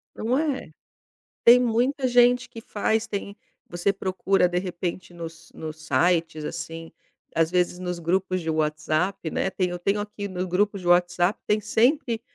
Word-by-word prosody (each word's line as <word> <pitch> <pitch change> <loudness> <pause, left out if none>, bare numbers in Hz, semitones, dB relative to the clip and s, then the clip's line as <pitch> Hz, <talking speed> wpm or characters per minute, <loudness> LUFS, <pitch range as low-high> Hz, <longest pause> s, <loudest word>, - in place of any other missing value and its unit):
Não 240 +4 0
é? 295 -3 -2 0.7
Tem 240 +1 +9
muita 250 +3 +1
gente 245 0 +4
que 230 - -10
faz. 220 0 -1
Tem 200 -2 -5 0.3
você 175 +3 0
procura 190 -1 +1
de 175 0 0
repente 180 -1 -5
nos 165 -1 -9
nos 155 0 -8
sites 165 -3 +1
assim, 165 0 -6 0.4
às 165 0 +2
vezes 180 0 +1
nos 180 -1 -4
grupos 185 +2 0
de 165 - -2
WhatsApp, 155 +3 -1
né, - - 0
tem 185 -1 -1
eu 175 - -4
tenho 200 +4 0
aqui 205 -1 -5
nos 185 -1 -3
grupos 195 +2 0
de - - -8
WhatsApp, 175 +2 +3
tem 210 - +2
sempre 235 +3 +1
185 Hz, 160 wpm, -25 LUFS, 170-215 Hz, 0.7 s, Tem